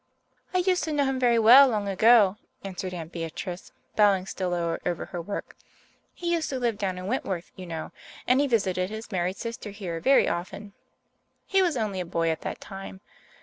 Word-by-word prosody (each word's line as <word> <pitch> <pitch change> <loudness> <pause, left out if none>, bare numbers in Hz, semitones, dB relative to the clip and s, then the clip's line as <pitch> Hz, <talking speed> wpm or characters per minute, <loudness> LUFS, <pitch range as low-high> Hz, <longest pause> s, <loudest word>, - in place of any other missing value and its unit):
"I 365 - 0
used 365 0 +2
to 315 - -3
know 290 -2 +2
him 265 -1 -1
very 240 -2 +3
well 245 +5 +9
long 210 -5 -1
ago," 205 0 +5 0.3
answered 185 -1 -5
Aunt 165 -2 -7
Beatrice, 170 +2 -6 0.2
bowing 200 -3 +4
still 185 -1 -3
lower 170 -1 -1
over 175 -1 -2
her 175 - -6
work. 200 +4 -6 0.6
"He 345 -1 -3
used 330 -2 -1
to 265 - -2
live 235 -4 -1
down 190 -2 -2
in 180 - -6
Wentworth, 190 -6 -3
you 185 -1 -9
know, 165 -2 -5 0.3
and 255 +2 +4
he 290 - +2
visited 190 -6 0
his 220 +1 -8
married 185 0 -1
sister 230 -2 -6
here 190 -5 -5
very 270 +10 +4
often. 190 +4 -4 0.7
He 390 0 +2
was 345 -7 +1
only 210 -4 -2
a 180 - -3
boy 165 0 +2
at 160 - -4
that - - -5
time. 195 -1 -9
200 Hz, 195 wpm, -26 LUFS, 180-245 Hz, 0.7 s, well